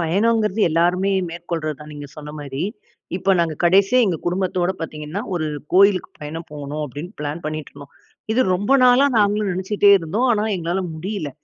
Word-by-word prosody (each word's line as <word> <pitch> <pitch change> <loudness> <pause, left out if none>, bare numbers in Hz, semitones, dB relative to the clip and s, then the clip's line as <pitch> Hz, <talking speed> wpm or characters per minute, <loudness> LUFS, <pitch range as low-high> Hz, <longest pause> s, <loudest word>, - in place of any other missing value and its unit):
பயணங்கிறது 210 +5 +1
எல்லோருமே 175 +4 +2 0.2
மேற்கொள்றது 165 -3 -4
தான் 150 0 -10
நீங்க 145 -1 -8
சொன்ன 150 -1 -8
மாரி. 140 0 -5 0.5
இப்ப 190 +1 +2
நாங்க 165 -2 0
கடைசியா 195 +7 +4
எங்க 175 - 0
குடும்பத்தோட 180 0 0
பார்த்தீங்கன்னா, 155 +3 -5
ஒரு 155 -3 -1 0.3
கோயிலுக்கு 195 0 +4
பயணம் 160 +3 -7
போணும் 150 +1 -5
அப்படீன்னு 150 - -8
பிளான் 150 +3 -4
பண்ணிட்டு 155 -1 -4
இருந்தோம். 140 0 -13 0.4
இது 240 - +2
ரொம்ப 205 +7 0
நாளா 250 +2 +6
நாங்களும் 205 -1 +2
நெனச்சிட்டே 200 +2 +2
இருந்தோம். 200 +10 -1
ஆனா, 210 -2 +1
எங்களால 175 +2 -2
முடியல. 175 -2 -4
175 Hz, 155 wpm, -21 LUFS, 155-200 Hz, 0.5 s, நாளா